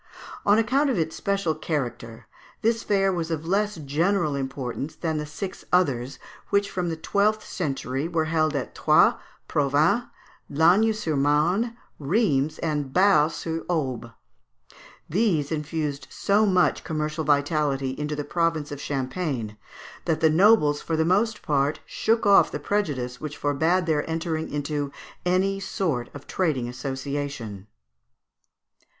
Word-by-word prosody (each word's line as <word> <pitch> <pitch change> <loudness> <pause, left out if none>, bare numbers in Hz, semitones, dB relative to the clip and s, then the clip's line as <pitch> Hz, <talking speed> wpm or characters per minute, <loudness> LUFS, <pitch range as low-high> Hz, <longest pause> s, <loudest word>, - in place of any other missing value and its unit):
On 205 +1 +6
account 265 +6 +2
of 250 - 0
its 160 -1 -1
special 200 -5 0
character, 120 -7 -4 0.4
this 230 +1 +2
fair 195 -2 +2
was 170 -2 -2
of 160 -1 -3
less 205 +4 +1
general 160 +2 0
importance 135 +1 -4
than 160 -2 -2
the 150 - -4
six 185 +5 -6
others, 135 -8 +1 0.3
which 200 0 +1
from 180 -2 -2
the 165 - -3
twelfth 210 +5 +1
century 140 -5 -3
were 165 -2 0
held 155 -1 +1
at 135 - -3
Troyes, - - +5 0.3
Provins, 150 - +2 0.4
Lagny 180 +9 +4
sur 210 -8 -2
Marne, 165 - +1 0.2
Rheims, 155 - +1
and 150 -4 -1
Bar 180 -3 +5
sur 165 +1 -4
Aube. 130 -8 -2 1.0
These 165 -7 +1
infused 150 -2 -3
so 210 +2 +2
much 185 -2 +2
commercial 155 0 -2
vitality 145 -2 +1
into 150 +2 -3
the 145 - -3
province 165 -1 -1
of 145 -1 -6
Champagne, 130 -5 -3 0.5
that 160 -2 +1
the 160 -1 +4
nobles 160 -4 +4
for 160 - -2
the 160 - +2
most 210 +5 +1
part 145 0 +1
shook 225 0 0
off 200 -1 +6
the - - -4
prejudice 145 -9 -2
which 150 -1 -6
forbad 160 +6 +1
their 155 -2 0
entering 160 -1 -2
into 145 -1 -2 0.4
any 190 +2 +1
sort 160 -10 -2
of 140 - -9
trading 150 -10 -1
association. 130 -5 -5
155 Hz, 140 wpm, -25 LUFS, 145-185 Hz, 1.0 s, On